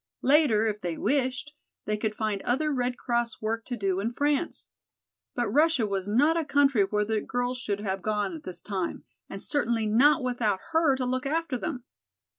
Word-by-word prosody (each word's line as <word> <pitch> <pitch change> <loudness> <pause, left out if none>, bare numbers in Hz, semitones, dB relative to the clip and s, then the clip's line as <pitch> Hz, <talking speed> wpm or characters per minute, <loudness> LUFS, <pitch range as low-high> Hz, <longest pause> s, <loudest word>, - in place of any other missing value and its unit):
Later, 270 -6 +4
if 210 -1 -2
they 175 -4 -3
wished, 270 +1 -1 0.3
they 215 - 0
could 215 0 -2
find 215 -3 -2
other 300 +5 0
Red 250 -1 -1
Cross 235 -2 -1
work 225 +1 -2
to 245 - -4
do 195 -3 0
in 220 +4 -1
France. 290 +4 -1 0.7
But 240 -1 0
Russia 300 -4 +3
was 195 -2 -2
not 285 +10 +3
a 335 - +1
country 280 -6 +3
where 210 +1 0
the 220 0 0
girls 245 +1 -2
should 205 -5 -3
have 195 -2 -2
gone 215 - -1
at 315 - -8
this 185 -11 -5
time, 190 -4 -3 0.3
and 195 - -6
certainly 235 -3 0
not 260 +8 +4
without 240 -6 0
her 320 -4 +3
to 260 -1 -2
look 255 +2 -1
after 320 -2 -1
them. 255 -1 -4
245 Hz, 190 wpm, -27 LUFS, 210-285 Hz, 0.7 s, Later